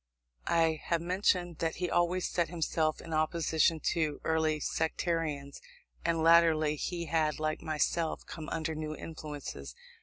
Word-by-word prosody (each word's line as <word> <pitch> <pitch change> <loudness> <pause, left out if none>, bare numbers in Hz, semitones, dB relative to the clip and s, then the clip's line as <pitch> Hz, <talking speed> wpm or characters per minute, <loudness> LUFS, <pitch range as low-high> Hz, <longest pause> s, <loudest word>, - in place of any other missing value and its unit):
I 165 -2 +2
have 170 - +1
mentioned 175 -1 0
that 165 -1 -1
he 180 - -2
always 175 +1 +1
set 170 -3 0
himself 160 -2 0
in 165 - -7
opposition 160 0 +2
to 155 -3 -1
our - - 0
early 160 -1 +1
sectarianism; 160 -3 -2 0.4
and 165 -1 +1
latterly 165 -2 +5
he 170 +3 -3
had, 155 -1 0
like 155 0 -1
myself, 160 +1 -1
come 160 -2 -7
under 160 0 -2
new 155 0 -4
influences. 155 - -7
160 Hz, 145 wpm, -31 LUFS, 155-170 Hz, 0.4 s, latterly